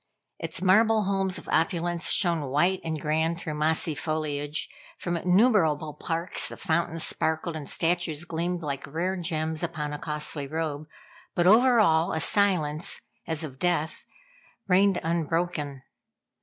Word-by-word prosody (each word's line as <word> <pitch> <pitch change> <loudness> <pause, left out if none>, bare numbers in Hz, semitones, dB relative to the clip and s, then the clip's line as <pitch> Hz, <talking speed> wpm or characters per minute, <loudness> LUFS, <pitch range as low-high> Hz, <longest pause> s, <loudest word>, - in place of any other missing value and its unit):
Its 165 +2 -4
marble 215 +3 +4
homes 195 -1 0
of 165 - -10
opulence 170 +1 0
shone 170 -7 +2
white 175 +7 +2
and 160 -1 -3
grand 160 +3 0
through 155 - -4
mossy 155 +1 +2
foliage; 150 -1 -2 0.3
from 175 -1 -3
innumerable 180 - +3
parks 165 +3 -3
the - - -9
fountains 165 -2 0
sparkled 160 +1 -1
and 150 -3 -6
statues 170 -2 0
gleamed 175 +1 -2
like 140 -2 -4
rare 175 +6 -2
gems 160 -3 -2
upon 150 -3 -3
a 150 - -5
costly 150 -1 -2
robe; 155 0 -3 0.5
but 175 - +2
over 235 +5 +6
all 165 -3 +3
a 160 - 0
silence, 180 -4 +1 0.3
as 160 0 -1
of 135 -4 -8
death, 170 -3 -1 0.6
reigned 195 0 +4
unbroken. 165 -4 -1
165 Hz, 140 wpm, -27 LUFS, 155-180 Hz, 0.6 s, over